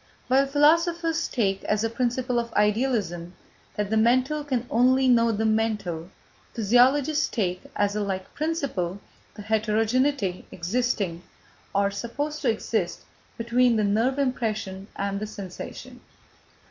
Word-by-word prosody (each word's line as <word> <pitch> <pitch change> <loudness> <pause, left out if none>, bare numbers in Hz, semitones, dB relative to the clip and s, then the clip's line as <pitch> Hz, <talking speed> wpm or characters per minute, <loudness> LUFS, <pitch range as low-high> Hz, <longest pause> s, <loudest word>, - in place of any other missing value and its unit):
While 270 +2 +4
philosophers 330 +3 +2
take 195 -5 -1
as 210 0 +1
a - - +2
principle 245 +1 0
of 235 -1 -4
idealism, 210 -6 0 0.4
that 210 0 -2
the 220 - +2
mental 255 +6 +2
can 255 -4 -2
only 255 +3 +3
know 235 -2 +4
the 220 0 -1
mental, 210 -7 -1 0.5
physiologists 260 +7 +3
take, 180 -5 -2
as 205 0 +1
a 210 - 0
like 190 -2 -4
principle, 275 - -2 0.4
the 210 - -9
heterogeneity 220 0 0
existing, 190 -2 -1 0.5
or 200 0 +2
supposed 285 +9 -4
to 265 - +2
exist, 215 -4 -1 0.4
between 235 +1 +2
the 215 - +2
nerve 225 +6 +1
impression 215 -8 -2
and 200 0 -2
the 215 - -4
sensation. 215 +6 -9
225 Hz, 130 wpm, -25 LUFS, 200-260 Hz, 0.5 s, While